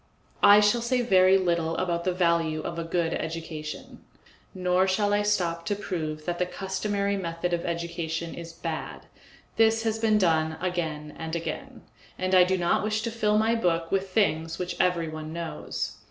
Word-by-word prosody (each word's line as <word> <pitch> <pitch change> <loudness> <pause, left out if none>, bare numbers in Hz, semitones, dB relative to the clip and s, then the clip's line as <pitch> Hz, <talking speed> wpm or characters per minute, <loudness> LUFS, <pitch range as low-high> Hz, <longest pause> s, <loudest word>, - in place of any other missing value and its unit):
I 205 +1 +8
shall 210 +3 +3
say 245 +2 +1
very 190 -3 +5
little 170 -3 0
about 170 -2 -1
the 185 - +2
value 170 -3 +1
of 170 +1 -5
a - - -2
good 165 0 -1
education, 160 -2 -6 0.5
nor 185 0 +1
shall 205 +2 +1
I 205 - +3
stop 175 -5 0
to 205 - +1
prove 155 -6 -4
that 175 -1 -2
the 180 - +1
customary 200 +1 -2
method 175 -1 -3
of 170 - -1
education 170 -1 -3
is 170 -1 -8
bad; 165 -1 -6 0.5
this 225 0 +4
has 225 -1 -1
been 220 -1 +3
done 160 -4 +2
again 160 -5 -3
and 160 0 -4
again, 260 +10 -5 0.3
and 185 0 -1
I 185 -1 +8
do 190 +1 +1
not 175 +2 +1
wish 215 0 -1
to 230 - -2
fill 210 -2 +1
my 220 +1 +3
book 170 -7 0
with 195 0 0
things 165 -5 +1
which 180 0 -4
everyone 160 -3 -1
knows. 170 -1 -4
180 Hz, 175 wpm, -27 LUFS, 165-205 Hz, 0.5 s, I